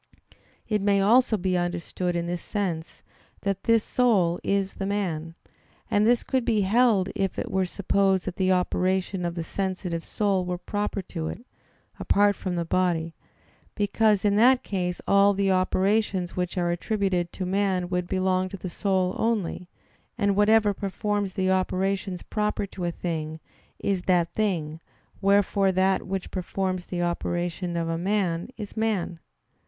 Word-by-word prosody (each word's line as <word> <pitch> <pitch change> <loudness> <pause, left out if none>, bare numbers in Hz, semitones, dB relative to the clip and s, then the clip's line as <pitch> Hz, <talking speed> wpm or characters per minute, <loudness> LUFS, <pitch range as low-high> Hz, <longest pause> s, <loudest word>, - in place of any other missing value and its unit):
It 210 -2 0
may 200 0 +3
also 225 +3 +4
be 185 -1 0
understood 175 0 -2
in 170 0 -1
this 175 0 -3
sense, 175 -6 -4 0.4
that 195 -1 -2
this 230 -1 +4
soul 195 -9 +2
is 195 -1 0
this 195 - -4
man; 165 -5 -2 0.6
and 205 +1 +3
this 240 0 +3
could 260 -2 0
be 220 -3 +2
held 205 -1 +3
if 195 -3 -2
it - - -3
were 190 -1 +1
supposed 195 0 +1
that 185 -1 -5
the 190 -1 +2
operation 185 +1 0
of 170 0 -3
the 170 - -3
sensitive 180 -2 -3
soul 200 -3 0
were 180 0 -3
proper 205 +2 -3
to 165 -3 -5
it, 235 +9 -7 0.5
apart 205 0 +3
from 185 -1 -3
the 170 -1 -1
body; 165 -2 0 0.6
because 210 0 +2
in 205 0 +3
that 250 +3 +5
case 180 -3 -2
all 200 0 +5
the 195 0 +2
operations 190 0 +1
which 180 0 -2
are 175 -1 +1
attributed 180 -1 -1
to 185 - -4
man 190 -1 0
would 180 -1 -2
belong 185 0 +1
to 195 - -7
the 185 -1 -6
soul 190 -1 0
only; 205 -5 -1 0.5
and 200 -3 +2
whatever 210 0 +4
performs 200 0 -2
the 190 0 +1
operations 190 0 -1
proper 210 -1 -1
to 190 -2 -6
a 170 - 0
thing, 160 -2 -4 0.4
is 195 -2 -1
that 175 -2 +1
thing; 165 -7 -1 0.4
wherefore 200 0 +3
that 190 +1 +1
which 190 -1 -4
performs 185 0 -2
the 175 -1 -2
operations 175 0 -2
of 165 -1 -1
a 165 0 -2
man 185 -1 0
is 210 -3 -7
man. 210 -6 -1
190 Hz, 160 wpm, -26 LUFS, 175-205 Hz, 0.6 s, that